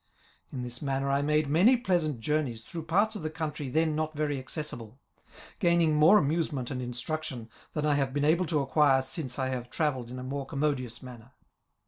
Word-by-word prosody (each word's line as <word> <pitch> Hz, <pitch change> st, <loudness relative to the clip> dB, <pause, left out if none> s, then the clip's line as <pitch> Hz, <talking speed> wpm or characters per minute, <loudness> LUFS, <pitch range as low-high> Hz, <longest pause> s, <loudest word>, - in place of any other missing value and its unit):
In 125 Hz, -2 st, -4 dB
this 120 Hz, 0 st, -7 dB
manner 135 Hz, -1 st, -1 dB
I 140 Hz, +1 st, +2 dB
made 150 Hz, +1 st, +2 dB
many 185 Hz, -, +5 dB
pleasant 170 Hz, -, 0 dB
journeys 135 Hz, -4 st, -1 dB
through 165 Hz, +4 st, -7 dB
parts 200 Hz, +7 st, +2 dB
of -, -, -5 dB
the 155 Hz, -, -2 dB
country 150 Hz, -3 st, -4 dB
then 155 Hz, +2 st, +1 dB
not 155 Hz, 0 st, -2 dB
very 145 Hz, -2 st, -1 dB
accessible, 130 Hz, -4 st, -6 dB, 0.6 s
gaining 170 Hz, -2 st, +3 dB
more 155 Hz, +7 st, +7 dB
amusement 150 Hz, -5 st, 0 dB
and 125 Hz, -2 st, -3 dB
instruction 125 Hz, 0 st, -4 dB, 0.2 s
than 150 Hz, -1 st, -1 dB
I 150 Hz, -, +3 dB
have 135 Hz, -2 st, +1 dB
been 145 Hz, +1 st, 0 dB
able 170 Hz, +3 st, +3 dB
to 155 Hz, -3 st, +1 dB
acquire 135 Hz, -1 st, +3 dB
since 130 Hz, -2 st, -3 dB
I 130 Hz, -1 st, -1 dB
have 125 Hz, -2 st, -4 dB
travelled 130 Hz, -5 st, -1 dB
in 125 Hz, -, -7 dB
a 125 Hz, -, -6 dB
more 135 Hz, +1 st, -4 dB
commodious 135 Hz, -5 st, -2 dB
manner. 125 Hz, 0 st, -12 dB
145 Hz, 190 wpm, -29 LUFS, 130-155 Hz, 0.6 s, more